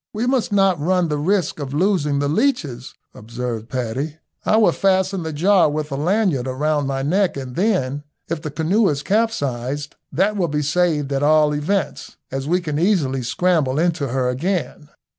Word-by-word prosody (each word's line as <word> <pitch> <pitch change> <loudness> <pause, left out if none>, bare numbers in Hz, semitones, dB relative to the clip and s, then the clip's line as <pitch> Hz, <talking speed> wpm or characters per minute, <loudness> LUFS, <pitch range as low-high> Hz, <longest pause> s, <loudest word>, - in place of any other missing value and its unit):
"We 220 +3 -1
must 250 -3 0
not 195 -4 +3
run 180 +1 +1
the 150 -1 -1
risk 180 0 0
of 140 -1 -5
losing 160 -5 +1
the 145 0 0
leeches," 150 - -1 0.2
observed 115 0 -5
Paddy. 130 +5 -3 0.3
"I 215 - +3
will 220 - +5
fasten 190 -1 +1
the 160 -1 -4
jar 180 +3 +3
with 150 0 -3
a - - -1
lanyard 165 - +1
round 145 +2 0
my 135 -1 -2
neck, 180 +3 +1
and 130 -2 -6
then, 175 -9 0 0.3
if 165 -2 -3
the 155 - -4
canoe 180 +8 +2
is 145 -1 -2
capsized, 145 - -1 0.2
that 200 +5 +1
will 185 -4 0
be 150 -1 -1
saved 150 -2 +1
at 135 - 0
all 150 0 +4
events, 155 +3 -2
as 135 +1 -3
we 180 +3 +1
can 150 -3 -3
easily 160 -9 +1
scramble 145 +1 +1
into 165 -3 +1
her 130 0 -1
again." 150 +2 -2
155 Hz, 180 wpm, -21 LUFS, 140-185 Hz, 0.3 s, will